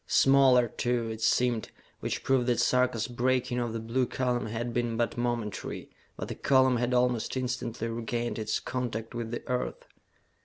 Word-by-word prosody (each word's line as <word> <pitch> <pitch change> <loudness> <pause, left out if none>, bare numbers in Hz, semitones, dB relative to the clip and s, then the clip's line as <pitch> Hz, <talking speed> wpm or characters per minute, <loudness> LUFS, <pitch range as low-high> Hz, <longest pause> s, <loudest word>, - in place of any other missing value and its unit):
Smaller, 135 -3 +5
too, 120 0 -1
it 110 0 -6
seemed, 120 0 +2 0.3
which - - -3
proved 130 -2 +2
that 120 -2 +2
Sarka's 125 -3 +2
breaking 125 0 0
of 120 -1 -1
the 115 - -3
blue 120 +3 0
column 125 -3 -1
had 115 +2 -3
been 120 -1 -1
but 120 0 0
momentary, 120 -4 -3 0.3
that - - -4
the - - -4
column 130 -2 +3
had 120 +1 0
almost 125 0 +1
instantly 120 -2 -3
regained 115 +1 -3
its 110 0 -1
contact 120 -3 -4
with 120 -1 -4
the 120 - -6
Earth. 125 0 -2
120 Hz, 165 wpm, -29 LUFS, 115-125 Hz, 0.3 s, Smaller